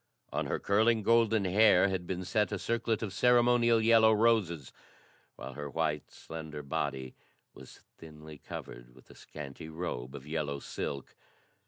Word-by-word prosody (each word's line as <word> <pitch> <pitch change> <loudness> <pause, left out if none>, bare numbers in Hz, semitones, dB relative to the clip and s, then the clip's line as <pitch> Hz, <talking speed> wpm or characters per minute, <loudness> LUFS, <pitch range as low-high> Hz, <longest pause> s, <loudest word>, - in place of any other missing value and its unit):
On - - -1
her - - -1
curling 110 +2 +2
golden 115 -2 +3
hair 100 0 +5
had 95 -2 -3
been 90 -1 -4
set 105 +3 0
a 105 - -1
circlet 115 +2 -1
of 100 -3 -4
ceremonial 120 0 +4
yellow 110 0 +5
roses, 105 - +1 0.6
while 70 - -8
her 75 +1 -6
white, 75 -1 -2
slender 80 -2 -8
body 70 -2 -3 0.4
was - - -14 0.2
thinly 75 -2 -12
covered - - -9
with 65 - -18
a - - -16
scanty 75 +1 -9
robe 80 -6 -5
of 65 - -9
yellow 75 -2 -3
silk. 70 0 -6
90 Hz, 150 wpm, -31 LUFS, 75-110 Hz, 0.6 s, hair